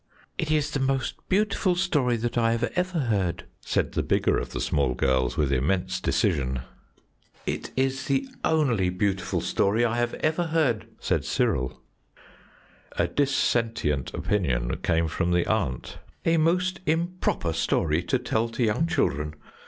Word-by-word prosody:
"It 160 - -1
is 155 -2 +1
the 140 - -1
most 135 -1 -2
beautiful 200 -2 +2
story 150 -10 +1
that 120 +1 -2
I 115 -1 +2 0.2
ever 180 0 0
heard," 100 -8 0 0.2
said - - -1
the - - 0
bigger - - +2
of - - -5
the - - -5
small 65 -3 +1
girls, 65 -1 +1
with 75 -3 +1
immense 90 +7 0
decision. 70 - +1 0.8
"It - - -3
is 135 0 0
the 140 - 0 0.2
only 125 -12 +2
beautiful 95 +1 -1
story 110 +4 +2
I 115 0 0
have 120 0 0
ever 160 +3 0
heard," 135 -10 +1
said - - 0
Cyril. 65 0 -1 1.1
A - - +1
dissentient 115 - 0
opinion 65 -13 0
came 80 -1 +1
from 85 +2 0
the 90 -1 +2
aunt. 60 -1 -2 0.3
"A 165 0 +4
most 180 +3 +2
improper 165 - 0
story 80 0 +1
to 90 +9 0
tell 115 -2 -1
to 120 +2 -2
young 115 +9 +2
children! 75 - 0
115 Hz, 145 wpm, -26 LUFS, -, 1.1 s, A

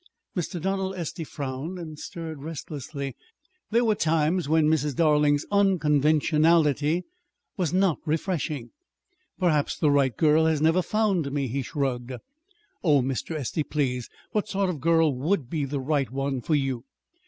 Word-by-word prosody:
Mr. 175 0 -3
Donald 190 +2 -1
Estey 170 -1 -4
frowned 140 +4 -5
and 155 -3 -8
stirred 160 -4 -7
restlessly 145 -3 -6 0.5
there 235 +2 +3
were 220 - +4
times 165 -3 +1
when 160 -1 +4
Mrs. 150 -3 +1
Darling's 150 -2 +3
unconventionality 155 -3 +3 0.5
was 180 -6 -1
not 185 -2 +2
"refreshing." 155 -4 -2 0.7
"Perhaps 155 -6 +1
the 150 - +3
right 135 -5 +2
girl 160 0 +4
has 160 -2 +2
never 165 +4 +3
found 195 -8 0
me," 140 -1 -1
he 135 +4 -2
shrugged. 130 -2 -2 0.7
"Oh, 145 -7 +4
Mr. 135 +5 -3
Estey, 150 +2 -2
please, 130 -5 -2 0.2
what 210 -1 0
sort 195 -2 0
of 165 - -5
a - - -12
girl 165 0 +3
would 145 0 -1
be 150 -4 -1
the 140 +1 -3
right 140 0 0
one 135 0 -2
for 155 - +1
you?" 135 -4 -1
155 Hz, 150 wpm, -26 LUFS, 140-170 Hz, 0.7 s, were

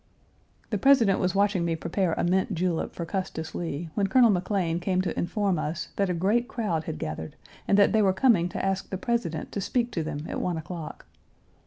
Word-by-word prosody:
The 210 - 0
President 235 -6 +5
was 185 +1 0
watching 200 -2 +2
me 170 -1 0
prepare 170 +2 -1
a - - -1
mint 190 +2 +1
julep 170 -1 -1
for 170 - -5
Custis 165 -3 -4
Lee 165 -1 -4
when 200 -1 +1
Colonel 235 +2 +5
McLean 180 -3 0
came 185 +1 0
to 185 - -2
inform 190 0 0
us 155 +3 -3
that 195 -2 +1
a 180 - 0
great 210 +8 +1
crowd 175 -10 -2
had 160 - -4
gathered 80 +1 -5 0.3
and 200 - +4
that 200 - +5
they 220 - +3
were 195 -2 +4
coming 190 -4 +3
to 175 - -3
ask 195 0 -1
the 190 - -3
President 195 -7 -2
to 200 - -3
speak 240 +4 0
to 170 - -2
them 155 -1 -4
at - - -3
one 175 -2 -1
o'clock. 160 0 -7
185 Hz, 210 wpm, -27 LUFS, 170-205 Hz, 0.3 s, President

